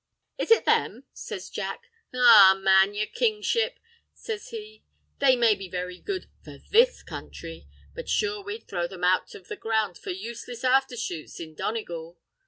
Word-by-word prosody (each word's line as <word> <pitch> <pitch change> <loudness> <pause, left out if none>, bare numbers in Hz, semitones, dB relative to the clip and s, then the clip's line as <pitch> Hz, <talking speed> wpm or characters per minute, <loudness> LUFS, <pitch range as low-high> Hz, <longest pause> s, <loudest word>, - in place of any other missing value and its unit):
"Is - - -2
it 455 - +5
them?" - - +1
says - - -7
Jack. 470 - -6 0.2
"Arrah, 225 -6 +8
man, 195 +1 +4
yer 210 +1 0
Kingship," 455 - 0 0.4
says 445 0 -6
he, 435 -2 -9 0.4
"they 270 -2 +5
may 235 -3 +4
be 195 -2 -8
very 180 0 -5
good—for 385 -2 -7
this 480 +4 +4
counthry; - - -9 0.3
but - - -8
sure 415 -1 0
we'd 415 +3 -7
throw 175 -2 -2
them 185 -1 -10
out 185 +1 +1
of 185 - -13
the - - -5
ground 220 -5 -1
for - - -9
useless 230 +5 -7
afther 260 -1 +2
shoots 175 -10 -6
in 160 -2 -8
Donegal. 170 -3 -5
230 Hz, 160 wpm, -26 LUFS, -, 0.4 s, Arrah